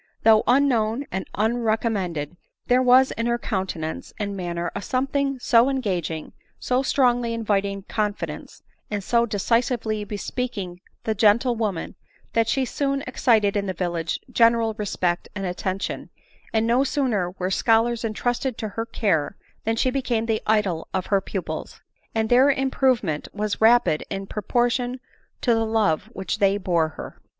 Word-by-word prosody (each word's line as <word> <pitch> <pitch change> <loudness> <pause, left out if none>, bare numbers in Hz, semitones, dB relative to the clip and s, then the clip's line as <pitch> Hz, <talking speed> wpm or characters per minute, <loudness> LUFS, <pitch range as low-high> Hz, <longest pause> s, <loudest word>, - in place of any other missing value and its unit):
Though 220 -1 +6
unknown 250 -1 +2
and 190 - -3
unrecom 225 +1 +1
mended, 175 -6 -3 0.3
there 250 +1 +4
was 255 +1 +5
in 230 +1 -2
her 235 0 +1
countenance 185 -8 -4
and 200 -1 -3
manner 175 -2 -3
a 200 - -4
something 275 +4 -1
so 235 -1 +4
engagmg, 185 - -2 0.3
so 250 +1 0
strongly 245 -4 +2
inviting 200 -3 -1
confidence, 210 0 -4 0.3
and 205 -2 -3
90 235 -1 +2
decisively 220 +1 0
bespeaking 205 -3 -4 0.2
the 220 - 0
gentlewoman, 215 -3 +2 0.4
that 230 -1 +2
she 265 +3 +1
soon 275 +2 -1
excited 225 -6 +2
in 200 -1 0
die 190 - -1
village 170 -2 -2
general 230 -1 +4
respect 185 -4 -2
and 195 -1 -3
attention; 185 +1 -3 0.4
and 220 0 +1
no 240 +3 +3
sooner 250 - 0
were 185 +1 -2
scholars 230 +3 +2
entrusted 245 +3 -1
to 215 - -4
her 225 +3 -4
care, 175 -7 0 0.3
than 225 +1 +1
she 255 +3 +1
became 250 -4 -1
the 220 -1 0
idol 200 -7 +1
of 185 - -1
her 195 - +4
pupils; 190 -1 -5 0.4
and 220 0 +1
their 255 +3 +6
improvement 260 - +1
was 210 0 -2
rapid 225 -8 +4
in 195 -1 -4
proportion 245 +4 0 0.4
to 240 - +3
the 225 0 +2
love 220 -8 +1
which 195 +3 -4
they 200 -1 +3
bore 170 -5 +1
her. 155 - -10
220 Hz, 150 wpm, -24 LUFS, 195-245 Hz, 0.4 s, Though